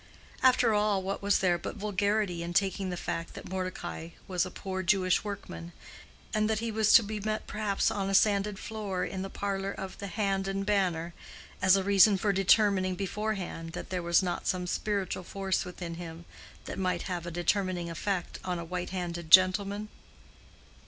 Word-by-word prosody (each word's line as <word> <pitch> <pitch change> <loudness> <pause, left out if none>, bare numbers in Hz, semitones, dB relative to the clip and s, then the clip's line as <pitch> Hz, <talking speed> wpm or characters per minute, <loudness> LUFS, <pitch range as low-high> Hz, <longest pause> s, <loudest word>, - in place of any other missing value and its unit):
After 250 -3 +5
all, 210 -2 +2
what 195 +1 -3
was 200 0 +3
there 175 -2 +2
but - - -5
vulgarity 205 -3 0
in 170 +1 -5
taking 195 0 +1
the 180 - -3
fact 165 0 -4
that - - -8
Mordecai 185 -3 -4 0.2
was 185 -1 0
a - - -6
poor 190 0 -4
Jewish 185 -1 +2
workman, 85 - -7 0.6
and 215 0 +2
that 220 - +1
he 230 +1 -2
was 215 -1 +3
to 230 - +9
be 210 +1 -4
met 215 +1 -2
perhaps 210 -2 0
on 195 -1 -2
a 195 - +1
sanded 205 0 +3
floor 210 -4 -3
in 190 - -4
the 195 - -4
parlor 195 -1 -2
of 190 -1 -7
the 200 - -5
Hand 195 -1 -1
and 195 0 -2
Banner 180 -5 0 0.5
as 185 0 +6
a 195 - +1
reason 200 +1 +6
for 200 +2 +1
determining 195 -1 +3
beforehand 195 -4 -3
that 180 - -7
there 180 -1 -1
was 170 +2 +3
not 175 -1 -2
some 180 -1 0
spiritual 195 0 -2
force 195 0 -2
within 175 -1 -6
him 165 0 -8 0.4
that - - -5
might 185 -1 0
have 175 -2 -4
a - - -2
determining 175 +1 0
effect 185 +1 -3
on 180 -1 -2
a 170 - -5
white 180 +1 -4
handed 175 -3 -4
gentleman? 195 +3 +5
190 Hz, 185 wpm, -29 LUFS, 180-205 Hz, 0.6 s, to